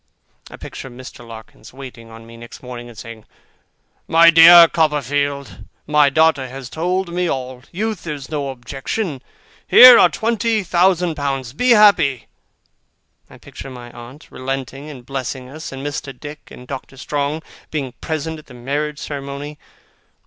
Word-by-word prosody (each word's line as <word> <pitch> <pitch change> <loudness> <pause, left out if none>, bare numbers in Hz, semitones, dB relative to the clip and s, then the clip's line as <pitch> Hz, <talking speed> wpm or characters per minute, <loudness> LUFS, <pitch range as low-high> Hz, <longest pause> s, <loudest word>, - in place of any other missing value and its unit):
I - - -11
picture 135 - -9
Mr. 125 -1 -12
Larkins 115 0 -13
waiting 125 -4 -11
on 115 0 -13
me 115 0 -14
next 120 +2 -13
morning, 120 -1 -9
and 115 - -15
saying, 115 -1 -10 0.8
'My 170 0 +6
dear 170 +1 +9
Copperfield, 145 -3 -1 0.3
my 150 -1 +3
daughter 150 -2 +2
has 130 0 -9
told 180 +2 -2
me 180 0 -1
all. 130 -1 -5
Youth 215 -1 -4
is 145 -4 -6
no 145 -3 -4
objection. 135 - -5 0.5
Here 250 0 +10
are - - +6
twenty 225 -1 -1
thousand 180 -1 +2
pounds. 135 -4 -4
Be 250 - 0
happy!' 200 - +4 1.0
I - - -15
picture - - -11
my 120 -2 -11
aunt 120 +6 -13
relenting, 135 +2 -6
and 130 -5 -11
blessing 130 -1 -5
us; 155 +5 -9
and 135 +1 -8
Mr. 140 -3 -6
Dick 145 0 -10
and 125 - -13
Doctor 135 +1 -8
Strong 145 +3 -3 0.3
being 140 -5 -4
present 160 0 -4
at 155 - -18
the 125 - -14
marriage 145 +4 -3
ceremony. 145 0 -7
140 Hz, 150 wpm, -19 LUFS, 130-160 Hz, 1.0 s, Here